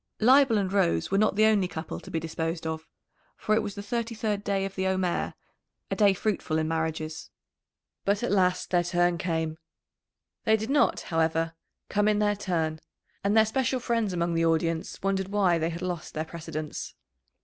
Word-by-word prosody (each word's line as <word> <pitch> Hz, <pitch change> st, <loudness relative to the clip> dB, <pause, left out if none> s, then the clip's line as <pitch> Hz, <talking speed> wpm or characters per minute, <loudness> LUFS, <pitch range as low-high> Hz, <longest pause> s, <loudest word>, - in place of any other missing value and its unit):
Leibel 260 Hz, 0 st, +6 dB
and 195 Hz, -2 st, -1 dB
Rose 85 Hz, -, +2 dB
were 195 Hz, -, +3 dB
not 215 Hz, -2 st, +3 dB
the 215 Hz, +1 st, +5 dB
only 210 Hz, -4 st, +3 dB
couple 160 Hz, -2 st, -6 dB
to -, -, -12 dB
be 165 Hz, -, -1 dB
disposed 165 Hz, +1 st, -3 dB
of, 160 Hz, 0 st, -4 dB, 0.5 s
for 215 Hz, -, 0 dB
it 220 Hz, -, +3 dB
was 205 Hz, -, -5 dB
the 200 Hz, -, -6 dB
thirty 230 Hz, +2 st, -2 dB
third 210 Hz, -2 st, -1 dB
day 195 Hz, -1 st, 0 dB
of 195 Hz, -, -5 dB
the 190 Hz, -1 st, -1 dB
Omer 185 Hz, -2 st, 0 dB, 0.6 s
a -, -, +1 dB
day 205 Hz, -3 st, +4 dB
fruitful 180 Hz, -5 st, -1 dB
in 155 Hz, 0 st, 0 dB
marriages. 160 Hz, -1 st, -3 dB, 0.7 s
But 200 Hz, +3 st, +1 dB
at -, -, 0 dB
last 185 Hz, -2 st, +2 dB
their 175 Hz, -1 st, +4 dB
turn 175 Hz, 0 st, +1 dB
came. 160 Hz, -2 st, -2 dB, 0.8 s
They 220 Hz, -1 st, +4 dB
did 220 Hz, +4 st, -4 dB
not, 290 Hz, -, +3 dB
however, 165 Hz, 0 st, 0 dB, 0.3 s
come 205 Hz, +1 st, +1 dB
in 210 Hz, -1 st, +3 dB
their 205 Hz, 0 st, +2 dB
turn, 165 Hz, -5 st, -1 dB, 0.4 s
and 200 Hz, +2 st, +2 dB
their 220 Hz, -, +7 dB
special 255 Hz, +3 st, 0 dB
friends 230 Hz, -4 st, 0 dB
among 170 Hz, -1 st, 0 dB
the 165 Hz, 0 st, +1 dB
audience 165 Hz, 0 st, 0 dB
wondered 195 Hz, -1 st, 0 dB
why 195 Hz, -4 st, +2 dB
they 165 Hz, +1 st, 0 dB
had 170 Hz, +1 st, -5 dB
lost 180 Hz, -3 st, -4 dB
their 155 Hz, +1 st, -2 dB
precedence. 160 Hz, -2 st, -6 dB
185 Hz, 190 wpm, -27 LUFS, 165-210 Hz, 0.8 s, their